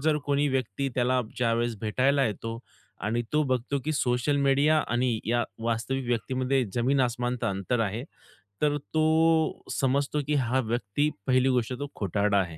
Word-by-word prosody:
जर 150 +1 +2
कोणी 145 +1 +2
व्यक्ती 130 0 -1
त्याला 125 +1 +2 0.2
ज्यावेळेस 115 -1 0
भेटायला 135 +5 +2
येतो 115 +2 -4 0.4
आणि 115 +2 0
तो 150 0 +3
बघतो, 130 +1 -1
की 155 - 0
सोशल 125 +1 +1
मीडिया 140 +3 +3
आणि 120 -1 +1
या 120 +1 +2 0.2
वास्तविक 115 +3 -1
व्यक्तीमध्ये 130 +2 0
जमीन 130 +3 +2
आसमानचं 120 -1 -1
अंतर 100 +5 -1
आहे. 110 +4 -2 0.6
तर 145 -1 +2 0.2
तो 160 0 +3
समजतो, 140 +2 0
की 150 - +1
हा 130 -1 +1
व्यक्ती 120 +4 0 0.2
पहिली 130 +1 +3
गोष्ट 125 -1 0
तो 145 - -3
खोटारडा 100 +1 +1
आहे. 85 -4 -3
130 Hz, 155 wpm, -27 LUFS, 115-140 Hz, 0.6 s, तो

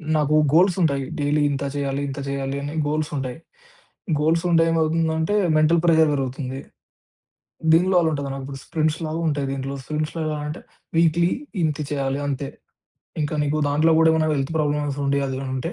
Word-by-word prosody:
నాకు 150 0 +2 0.2
గోల్సుంటాయి, 165 -5 +3 0.2
డైలీ 145 +1 +1
ఇంత 140 0 -2
చెయ్యాలి, 140 -1 -2
ఇంత 135 - -6
జెయ్యాలి 140 0 -3
అని 145 +1 -5
గోల్సుంటాయి. 145 -4 -2 0.8
గోల్సుంటే 165 +2 +3
ఏమవుతుందంటే, 160 +2 +1 0.2
మెంటల్ 160 +2 +4
ప్రెజర్ 160 -2 +5
వెరుగుతుంది. 135 -1 -3 1.1
దీనిలో 180 +3 +4
అలా 165 - +2
ఉంటదనమాట. 140 -2 -4
ఇప్పుడు 135 0 -7
స్ప్రింట్స్‌లాగుంటాయి 155 -2 -1
దీంట్లో. 135 0 -4
సుంషొలా 155 0 -2
అంటే, 150 - -5 0.4
వీక్లీ 170 +1 +3 0.3
ఇంతె 150 -1 -1
చెయ్యాలి 140 -1 -1
అంతే. 140 0 -3 0.7
ఇంకా 150 +1 -2
నీకు 150 +1 0
దాంట్లో 150 +3 +3
గూడా 160 0 +5
ఏమన్నా 160 -1 +2
వెల్త్ 135 +2 -2
ప్రాబ్లమ్సుండి, 145 -2 0
అదేమైనుంటే, 130 +4 -3
150 Hz, 130 wpm, -23 LUFS, 140-160 Hz, 1.1 s, ప్రెజర్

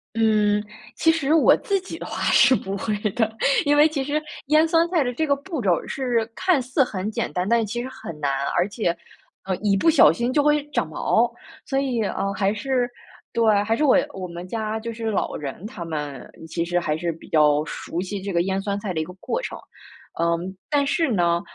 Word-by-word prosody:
嗯， 210 -2 +3 0.3
其 325 - +4
实 310 -1 +1
我 325 - +6
自 395 -2 0
己 375 - -8
的 - - -7
话 - - -5
是 245 +2 +6
不 195 +1 -4
会 210 +2 -2 0.2
的， 220 -2 0 0.3
因 290 0 +3
为 300 +2 +6
其 300 -3 -2
实 290 +3 -1 0.3
腌 310 +3 +4
酸 330 +1 +3
菜 330 -6 +2
的 245 - -2
这 315 - 0
个 280 -2 +2
步 300 -3 -5
骤 195 - +2
儿 - - -7
是 245 -4 -1
看 360 -7 +2
似 255 +3 +1
很 200 -5 -2
简 - - -2
单， 180 +4 -1
但 235 0 +4
是 - - 0
其 240 +4 -3
实 255 - -4
很 220 -11 -9
难。 140 -1 -1
而 180 +3 +2
且， 205 -1 -1 0.6
呃， 190 0 -1
一 205 -2 +1
不 325 - +2
小 305 - +7
心 240 +9 -1
就 290 +1 +3
会 295 0 +2
长 - - 0
毛， - - +1 0.3
所 270 - -1
以， 260 -4 0
呃， 195 -1 -2
还 200 0 +1
是 245 +3 -1 0.4
对， 215 -3 +3
还 225 +2 0
是 305 - +1
我 275 - +5 0.2
我 185 -1 -5
们 175 +1 -8
家 220 0 -3
就 230 +1 -5
是 225 -1 -3
老 - - -1
人， 145 +5 -6
他 215 -6 -6
们 150 -4 -5 0.2
其 170 +1 -2
实 175 +1 0
还 155 -3 -1
是 170 0 -2
比 165 - -14
较 150 -1 +3
熟 165 +1 -5
悉 195 +2 -4
这 200 +1 -4
个 170 -1 +2
腌 190 +1 -1
酸 200 0 -2
菜 195 -3 -3
的 160 - -4
一 155 - -1
个 180 - -10
过 470 - -2
程。 - - -5 0.6
嗯， 170 0 +1 0.3
但 290 -2 +2
是 320 +3 +1
呢， 170 -3 +2
220 Hz, 245 characters per minute, -23 LUFS, 180-270 Hz, 0.6 s, 小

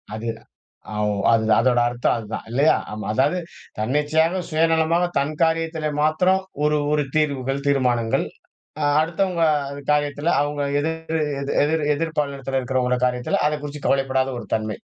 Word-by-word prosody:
அது. 115 +1 -4 0.7
அவ் 105 0 +1 0.2
அது 115 -1 +3 0.2
அதோட 120 0 +3
அர்த்தம் 120 0 0
அதான் 110 -1 -6
இல்லையா? 140 +5 +4 0.2
ஆமா. 105 0 -6
அதாது 145 +9 +2 0.4
தன்னிச்சையாக, 150 +9 +1
சுயநலமாக, 165 +2 +2
தன் 150 +2 -2
காரியத்தில 160 -1 0
மாத்ரம் 180 +5 +2 0.2
ஒரு 150 0 +2 0.2
ஒரு 150 -1 +2
தீர்வுகள், 140 -3 0
தீர்மானங்கள். 125 -5 +1 0.6
அ - - +2 0.2
அடுத்தவங்க 170 +2 0 0.5
காரியத்துல 145 +2 +1
அவங்க 145 0 -1 0.2
எதிர் 160 +1 -2 0.4
எதிர் 155 +1 +1
எதிர் 160 +2 -3
பாலினத்துல 135 -2 -1
இருக்கறவங்கள 125 0 0
காரியத்துல 125 0 0
அதை 150 - -1
குறிச்சு 145 0 -7
கவலைப்படாத 135 -1 +1
ஒரு 110 - -8
தன்மை. 110 -1 -1
145 Hz, 135 wpm, -22 LUFS, 130-160 Hz, 0.7 s, இல்லையா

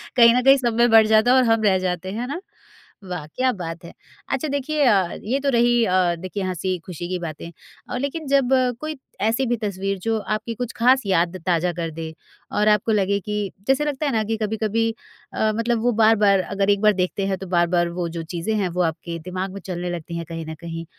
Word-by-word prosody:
कहीं 235 -1 +7
न 250 - +3
कहीं 270 +1 +7
सब 240 -3 0
में 240 0 +5
बँट 220 -1 +7
जाता 220 +3 +4
और 260 - +5
हम 225 -1 +2
रह 190 -2 +4
जाते, 185 0 -3
है 235 +4 -4
ना? 345 +7 -5 0.7
वाह, 170 -5 -4
क्या 255 +9 0
बात 170 -2 -6
है! - - -11 0.4
अच्छा 310 - -1
देखिए 285 +2 -1
अ, 195 -7 +3
ये 260 +6 0
तो 280 - +1
रही 240 0 +3
अ, 180 -2 +2
देखिए 185 +2 -5
हँसी-खुशी 180 -2 -4
की 180 -1 -2
बातें, 170 0 -7 0.4
अ, 250 - -3
लेकिन 280 +3 -4
जब 275 -2 +2 0.3
कोई 310 -1 -4 0.2
ऐसी 230 +5 +1
भी 240 0 0
तस्वीर 195 -1 -2
जो 225 -1 +1 0.2
आपकी 230 +2 -5
कुछ 245 0 -4
खास 255 +3 +4
याद 180 -1 +1
ताज़ा 175 0 +1
कर 165 -1 -2
दे 165 - -4 0.5
और 210 - +3
आपको 210 +1 +2
लगे 200 -1 +1
कि 210 +2 -5 0.3
जैसे 270 +3 +2
लगता 295 0 -2
है 280 - +1
ना 220 -2 +1
कि 225 - 0
कभी-कभी 220 +1 0 0.4
अ, 215 0 +1
मतलब 230 0 0
वो 245 - +3
बार-बार 210 -3 +5 0.2
अगर 195 0 +1
एक 200 0 +3
बार 210 -1 +5
देखते 195 +2 -2
हैं 190 -1 -1
तो 190 - -8
बार-बार 175 0 +2
वो 170 - -1
जो 165 - -3
चीज़ें 175 +6 -2
हैं 190 -3 0
वो 180 +1 -1
आपके 165 +1 -7
दिमाग 185 +1 -3
में 200 - -8
चलने 180 -1 -4
लगती 170 0 -5
हैं 170 - -5
कहीं 165 -1 -5
न 160 - -6
कहीं, 165 0 -6
205 Hz, 225 wpm, -22 LUFS, 180-240 Hz, 0.7 s, कहीं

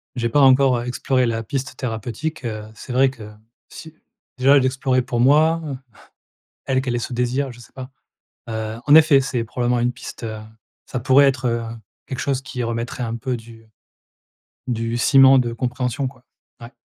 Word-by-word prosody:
J'ai 120 -2 -1
pas 145 +5 +3
encore, 130 -1 +5
heu, 120 - -4
exploré 130 +1 0
la 115 -1 -1
piste 135 +4 -5
thérapeutique, 120 +6 -4
heu, 110 -2 -4
c'est 130 - -10
vrai 130 +2 +3
que 110 -5 -11 0.4
si 160 -1 -12 0.4
déjà 135 +2 +5
l'explorer 130 0 +1
pour 120 -1 -3
moi, 155 +5 +4 1.1
elle, 130 -1 +1
qu'elle 125 -2 -2
ait - - 0
ce 120 - -5
désir, 125 +2 -1
je 120 - -15
sais - - -16
pas, 130 0 -9 0.6
heu, 110 0 -4
en 145 - +5
effet, 155 -3 +6
c'est 125 -3 -2
probablement 120 +1 -1
une 120 +1 +1
piste, 120 -1 -9
heu, 110 -1 -5 0.5
ça 130 - -4
pourrait 135 +3 +5
être, 130 -2 0
heu, 115 0 0 0.4
quelque 130 - -6
chose 135 -2 -1
qui 125 -1 -5
remettrait 115 +1 -3
un 115 0 -4
peu 125 +2 -3
du 115 -1 -15 1.0
du 115 -1 -2
ciment 135 +1 +6
de 120 -2 0
compréhension, 125 +3 -2
quoi. 125 -1 -10 0.4
Ouais. 120 +2 -11
125 Hz, 180 wpm, -21 LUFS, 115-135 Hz, 1.1 s, effet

